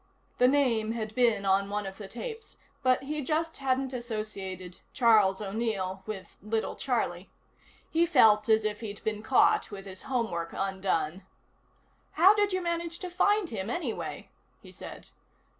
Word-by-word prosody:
The 250 Hz, -, +6 dB
name 240 Hz, -5 st, +2 dB
had 220 Hz, -2 st, -4 dB
been 230 Hz, -4 st, +2 dB
on 195 Hz, +1 st, +2 dB
one 205 Hz, 0 st, -2 dB
of 195 Hz, +1 st, -7 dB
the 205 Hz, -, -7 dB
tapes, 445 Hz, -, -8 dB, 0.2 s
but 255 Hz, 0 st, +2 dB
he 300 Hz, +2 st, -3 dB
just 320 Hz, +4 st, -1 dB
hadn't 265 Hz, 0 st, 0 dB
associated 205 Hz, -6 st, -5 dB
"Charles 215 Hz, -5 st, +4 dB
O'Neill" 200 Hz, -2 st, -2 dB
with 205 Hz, -3 st, -7 dB
"Little 220 Hz, +2 st, -2 dB
Charlie." -, -, -2 dB, 0.6 s
He 335 Hz, +1 st, +2 dB
felt 220 Hz, -8 st, +5 dB
as 220 Hz, -1 st, +4 dB
if 210 Hz, -1 st, -1 dB
he'd 205 Hz, -3 st, -7 dB
been 215 Hz, -1 st, -2 dB
caught 245 Hz, +4 st, +3 dB
with 195 Hz, -1 st, -8 dB
his 190 Hz, -1 st, -9 dB
homework 220 Hz, -11 st, -2 dB
undone. 190 Hz, -3 st, -1 dB, 0.9 s
"How 370 Hz, +5 st, +7 dB
did 410 Hz, -1 st, +2 dB
you 370 Hz, -1 st, -1 dB
manage 340 Hz, 0 st, -2 dB
to 365 Hz, -2 st, -6 dB
find 410 Hz, +1 st, +2 dB
him, 200 Hz, -2 st, -4 dB
anyway?" 255 Hz, -3 st, -4 dB, 0.3 s
he -, -, -14 dB
said. -, -, -10 dB
220 Hz, 155 wpm, -29 LUFS, 195-270 Hz, 0.9 s, How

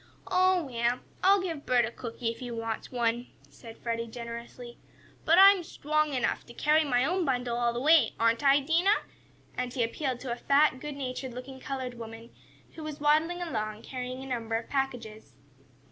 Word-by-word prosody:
"Oh, 370 Hz, -1 st, +4 dB
well, 240 Hz, -2 st, -1 dB, 0.2 s
I'll 390 Hz, 0 st, +5 dB
give 325 Hz, -6 st, -4 dB
Bert 245 Hz, -2 st, +4 dB
a 225 Hz, -, -5 dB
cookie 235 Hz, 0 st, -4 dB
if 230 Hz, -, -11 dB
he 250 Hz, -2 st, -6 dB
wants 225 Hz, -1 st, -4 dB
one," 240 Hz, 0 st, 0 dB, 0.2 s
said 230 Hz, -2 st, -12 dB
Freddie, 230 Hz, 0 st, -3 dB
generously, 235 Hz, +1 st, -8 dB, 0.5 s
"but 330 Hz, +2 st, +5 dB
I'm 390 Hz, -1 st, +8 dB
strong 305 Hz, -2 st, -1 dB
enough 250 Hz, -, 0 dB
to 240 Hz, -, -12 dB
carry 305 Hz, +4 st, +3 dB
my 250 Hz, -3 st, +2 dB
own 360 Hz, +4 st, 0 dB
bundle 245 Hz, -4 st, -1 dB
all 240 Hz, 0 st, +1 dB
the 235 Hz, -, -3 dB
way; 300 Hz, -3 st, +5 dB
aren't 230 Hz, +4 st, +2 dB
I, 280 Hz, +1 st, +5 dB
Dinah?" 340 Hz, +8 st, +2 dB, 0.5 s
and 250 Hz, 0 st, -2 dB
he 245 Hz, -1 st, 0 dB
appealed 250 Hz, +2 st, -2 dB
to 260 Hz, -, -4 dB
a -, -, -1 dB
fat, 280 Hz, +1 st, +3 dB
good 295 Hz, +1 st, -6 dB
natured 255 Hz, -2 st, -5 dB
looking 260 Hz, +1 st, -8 dB
colored 260 Hz, -2 st, -4 dB
woman, 225 Hz, 0 st, -9 dB, 0.4 s
who 325 Hz, -, -9 dB
was 305 Hz, -1 st, -6 dB
waddling 315 Hz, +4 st, +2 dB
along, 215 Hz, -9 st, -4 dB
carrying 255 Hz, 0 st, -6 dB
a -, -, -8 dB
number 230 Hz, -3 st, -3 dB
of 225 Hz, 0 st, -3 dB
packages. 230 Hz, -, -3 dB
255 Hz, 185 wpm, -29 LUFS, 235-300 Hz, 0.5 s, I'm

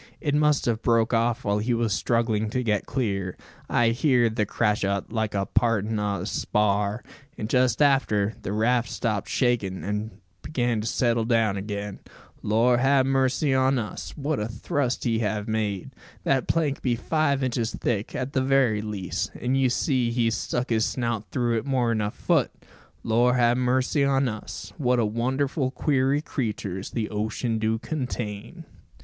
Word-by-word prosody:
"It 145 Hz, -3 st, -1 dB
must 150 Hz, -1 st, +3 dB
have 115 Hz, -2 st, 0 dB
broke 115 Hz, 0 st, +2 dB
off 115 Hz, 0 st, +1 dB
while 100 Hz, 0 st, +1 dB
he 120 Hz, +3 st, 0 dB
was 115 Hz, -3 st, 0 dB
struggling 110 Hz, -1 st, 0 dB
to 125 Hz, +3 st, -1 dB
get 105 Hz, -3 st, 0 dB
clear, 100 Hz, -8 st, -2 dB, 0.3 s
I 120 Hz, -1 st, +3 dB
heerd 120 Hz, -2 st, +2 dB
the 105 Hz, -3 st, 0 dB
crash 105 Hz, -2 st, 0 dB
o't, 100 Hz, 0 st, -1 dB
like 110 Hz, -2 st, -1 dB
the 100 Hz, -1 st, 0 dB
partin' 110 Hz, -1 st, +1 dB
o' 100 Hz, -3 st, -1 dB
a -, -, -4 dB
spar; 105 Hz, +1 st, 0 dB, 0.3 s
and 105 Hz, -, -3 dB
just 125 Hz, +2 st, +3 dB
after, 110 Hz, -7 st, +2 dB
the -, -, -4 dB
raft 115 Hz, +2 st, +1 dB
stopped 105 Hz, -4 st, -2 dB
shakin', 105 Hz, -, 0 dB
an' 105 Hz, +3 st, -2 dB, 0.3 s
began 120 Hz, -6 st, -1 dB
to 110 Hz, -, -4 dB
settle 115 Hz, -1 st, +1 dB
down 115 Hz, -3 st, +2 dB
again. 100 Hz, 0 st, -5 dB, 0.4 s
Lor 120 Hz, +3 st, +3 dB
ha 135 Hz, +1 st, +4 dB
mercy 135 Hz, +1 st, +1 dB
on 130 Hz, 0 st, +3 dB
us! 110 Hz, +5 st, -5 dB
what 145 Hz, +1 st, -1 dB
a 105 Hz, -, -2 dB
thrust 120 Hz, +3 st, -2 dB
he 115 Hz, -3 st, +1 dB
have 105 Hz, -1 st, -2 dB
made! 105 Hz, -4 st, -2 dB, 0.3 s
That 135 Hz, -1 st, +1 dB
plank 155 Hz, -4 st, 0 dB
be 125 Hz, -2 st, +1 dB
five 140 Hz, +1 st, 0 dB
inches 120 Hz, -3 st, -1 dB
thick, 110 Hz, -3 st, -2 dB
at 130 Hz, +2 st, -3 dB
the 130 Hz, -, +2 dB
very 130 Hz, -5 st, +2 dB
least, 105 Hz, -4 st, -3 dB
an' 125 Hz, +2 st, -1 dB
you 135 Hz, -1 st, +3 dB
see 125 Hz, -1 st, +1 dB
he's 115 Hz, -1 st, +1 dB
stuck 120 Hz, +3 st, -2 dB
his 110 Hz, -1 st, +2 dB
snout 115 Hz, -4 st, -1 dB
through 120 Hz, -2 st, +1 dB
it -, -, -9 dB
more'n 120 Hz, -5 st, +1 dB
a 105 Hz, -, 0 dB
foot! -, -, +1 dB, 0.5 s
Lor 120 Hz, +3 st, +3 dB
'a 120 Hz, -1 st, +4 dB
mercy 130 Hz, +3 st, +1 dB
on 135 Hz, -1 st, +2 dB
us! 110 Hz, -3 st, -6 dB
What 125 Hz, -3 st, +2 dB
wonderful 130 Hz, +4 st, 0 dB
queery 135 Hz, +1 st, +1 dB
creeturs 105 Hz, -, -3 dB
the 110 Hz, -3 st, -3 dB
ocean 110 Hz, +2 st, -2 dB
do 110 Hz, +1 st, +1 dB
contain!" 125 Hz, -, -5 dB
115 Hz, 170 wpm, -25 LUFS, 105-130 Hz, 0.5 s, ha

